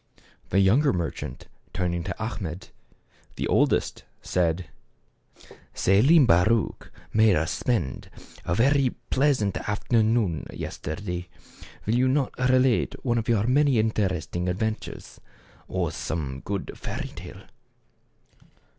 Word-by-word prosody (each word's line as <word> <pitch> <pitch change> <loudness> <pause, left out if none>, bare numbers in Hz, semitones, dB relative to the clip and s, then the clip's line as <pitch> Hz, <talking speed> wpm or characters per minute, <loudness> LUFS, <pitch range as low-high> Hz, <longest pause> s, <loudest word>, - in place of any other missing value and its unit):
The 95 - +2
younger 120 +10 +4
merchant, 85 -2 -4 0.3
turning 85 -2 -1
to 95 - -3
Achmet, 95 -6 -5 0.6
the - - -2
oldest, - - +1 0.2
said, 85 0 0 0.6
" - - -22
Selim 130 - +5
Baruch 105 +5 +2 0.2
made 110 -3 +5
us 80 +2 0
spend 95 - -2 0.3
a 85 - -1
very 135 +3 +3 0.2
pleasant 130 -8 +2
afternoon 110 - 0
yesterday. 90 +1 -5 0.6
Will 120 +4 +2
not 135 0 +1
you 125 - -1
relate 130 -1 +3
one 120 -2 +2
of 115 - -4
your 110 -3 +2
many 135 +1 +3
interesting 95 -5 0
adventures, 110 +4 -4 0.5
or - - -1
some 70 -5 -4
good 100 -1 -4
fairy - - -5
tale - - -11
105 Hz, 110 wpm, -26 LUFS, 90-125 Hz, 0.6 s, Selim